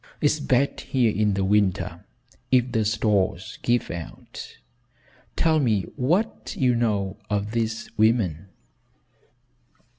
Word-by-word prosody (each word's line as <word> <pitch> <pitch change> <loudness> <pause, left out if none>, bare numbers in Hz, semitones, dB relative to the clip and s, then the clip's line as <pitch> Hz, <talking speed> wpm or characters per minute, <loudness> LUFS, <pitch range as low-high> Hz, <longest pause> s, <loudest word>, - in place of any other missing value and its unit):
It's 150 0 +2
bad 140 -1 +1
here 125 -4 +1
in 105 -1 +2
the 95 -1 0
winter 100 -2 +1 0.5
if 125 -1 +3
the 110 -3 +1
stores 105 -2 0
give 120 0 +1
out. 85 -1 -8 0.8
Tell 160 -1 +3
me 110 -8 +2
what 175 - 0
you 125 -2 +3
know 105 -5 0
of 105 0 -1
these 115 -1 -2
women." 105 -6 +2
110 Hz, 115 wpm, -24 LUFS, 100-125 Hz, 0.8 s, if